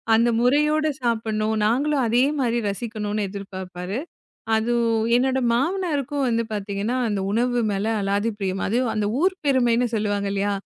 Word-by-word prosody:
அந்த 235 Hz, +1 st, +3 dB
முறையோடு 300 Hz, +4 st, +3 dB
சாப்பிடணும். 220 Hz, -2 st, 0 dB
நாங்களும் 275 Hz, +4 st, +1 dB
அதே 240 Hz, +3 st, +3 dB, 0.2 s
மாரி 240 Hz, -2 st, +1 dB
ரசிக்கணும்னு 210 Hz, -1 st, -3 dB
எதிர்பாப்பாரு. 190 Hz, +1 st, -6 dB, 0.6 s
அது 225 Hz, +2 st, 0 dB, 0.4 s
என்னோட 265 Hz, +1 st, +1 dB, 0.2 s
மாமனாருக்கும் 290 Hz, -2 st, 0 dB
வந்து 230 Hz, 0 st, +1 dB
பார்த்தீங்கன்னா 205 Hz, +3 st, -2 dB
அந்த 205 Hz, -2 st, -1 dB
உணவு 245 Hz, +3 st, +1 dB
மேல 200 Hz, +2 st, -1 dB
அலாதி 200 Hz, +3 st, 0 dB
ப்ரியம். 195 Hz, -1 st, -2 dB
அதுவும் 240 Hz, +2 st, +1 dB
அந்த 210 Hz, -1 st, 0 dB
ஊர் 375 Hz, +1 st, +3 dB
பெருமைன்னு 245 Hz, -3 st, +3 dB
சொல்லுவாங்க 205 Hz, -2 st, -1 dB
இல்லையா? 200 Hz, 0 st, 0 dB
230 Hz, 135 wpm, -23 LUFS, 205-255 Hz, 0.6 s, அந்த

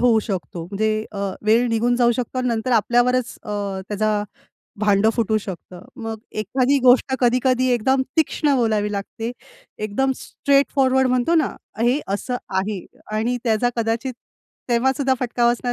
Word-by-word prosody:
होऊ 240 Hz, -2 st, +4 dB
शकतो. 185 Hz, -5 st, -5 dB
म्हणजे 215 Hz, +4 st, -1 dB
अ, 205 Hz, -, -6 dB, 0.3 s
वेळ 230 Hz, +3 st, +4 dB
निघून 235 Hz, +2 st, +1 dB
जाऊ 240 Hz, -1 st, +4 dB
शकतो, 250 Hz, +1 st, -3 dB
नंतर 235 Hz, 0 st, -1 dB
आपल्यावरच 245 Hz, +2 st, +2 dB
अ, -, -, -8 dB, 0.4 s
त्याचा 210 Hz, 0 st, 0 dB, 0.6 s
भांडं 210 Hz, +1 st, +3 dB
फुटू 220 Hz, -2 st, +1 dB
शकतं. 185 Hz, -3 st, -9 dB, 0.2 s
मग 225 Hz, 0 st, -4 dB, 0.2 s
एखादी 255 Hz, +6 st, +1 dB
गोष्ट 255 Hz, +1 st, +5 dB
कधी-कधी 255 Hz, +1 st, +2 dB
एकदम 260 Hz, +3 st, +2 dB
तीक्ष्ण 300 Hz, -2 st, +2 dB
बोलावी 215 Hz, -3 st, +1 dB
लागते, 210 Hz, +3 st, -4 dB, 0.5 s
एकदम 215 Hz, +6 st, 0 dB
स्ट्रेट 280 Hz, -1 st, +1 dB
फॉरवर्ड 265 Hz, -1 st, +3 dB
म्हणतो 255 Hz, +6 st, +2 dB
ना, 315 Hz, -4 st, +2 dB, 0.3 s
हे 245 Hz, +5 st, +2 dB
असं 245 Hz, +5 st, -3 dB, 0.2 s
आहे 195 Hz, -1 st, -3 dB, 0.3 s
आणि 235 Hz, +3 st, 0 dB
त्याचा 230 Hz, +1 st, +2 dB
कदाचित 230 Hz, +3 st, -1 dB, 0.6 s
तेव्हासुद्धा 265 Hz, +3 st, +2 dB
फटका 240 Hz, -1 st, +1 dB
बसणार 245 Hz, 0 st, -2 dB
240 Hz, 140 wpm, -21 LUFS, 215-255 Hz, 0.6 s, गोष्ट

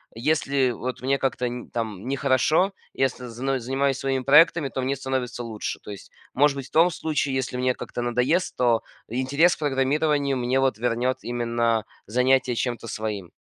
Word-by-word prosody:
если 135 Hz, 0 st, +1 dB
вот 125 Hz, +2 st, -5 dB
мне 135 Hz, +2 st, +1 dB
как-то 125 Hz, -1 st, -1 dB
не, 120 Hz, 0 st, -7 dB
там, 110 Hz, -2 st, -4 dB
нехорошо, 140 Hz, +7 st, +2 dB, 0.2 s
если 130 Hz, -2 st, -1 dB
зно 130 Hz, +3 st, -2 dB
занимаюсь 135 Hz, +2 st, 0 dB
своими 135 Hz, -1 st, -1 dB
проектами, 150 Hz, +1 st, +5 dB
то 130 Hz, -, -3 dB
мне 135 Hz, +2 st, 0 dB
становится 130 Hz, -2 st, -3 dB
лучше. 110 Hz, -3 st, -5 dB
То -, -, -9 dB
есть, 100 Hz, -, -10 dB, 0.2 s
может 145 Hz, +1 st, +3 dB
быть, 135 Hz, -2 st, -6 dB
в -, -, -25 dB
том 165 Hz, +3 st, +5 dB
случае, 150 Hz, -5 st, -1 dB
если 130 Hz, -1 st, -2 dB
мне 125 Hz, 0 st, +1 dB
как-то -, -, -6 dB
надоест, 125 Hz, +9 st, 0 dB
то 120 Hz, -2 st, +3 dB, 0.3 s
интерес 135 Hz, +8 st, +2 dB
к -, -, -21 dB
программированию 145 Hz, 0 st, +1 dB
мне 125 Hz, +2 st, +1 dB
вот 130 Hz, -5 st, +1 dB
вернет 120 Hz, +2 st, 0 dB
именно 115 Hz, -2 st, 0 dB, 0.2 s
занятие 125 Hz, +2 st, +2 dB
чем-то 120 Hz, -1 st, -2 dB
своим. 105 Hz, -5 st, -4 dB
130 Hz, 170 wpm, -24 LUFS, 120-140 Hz, 0.3 s, проектами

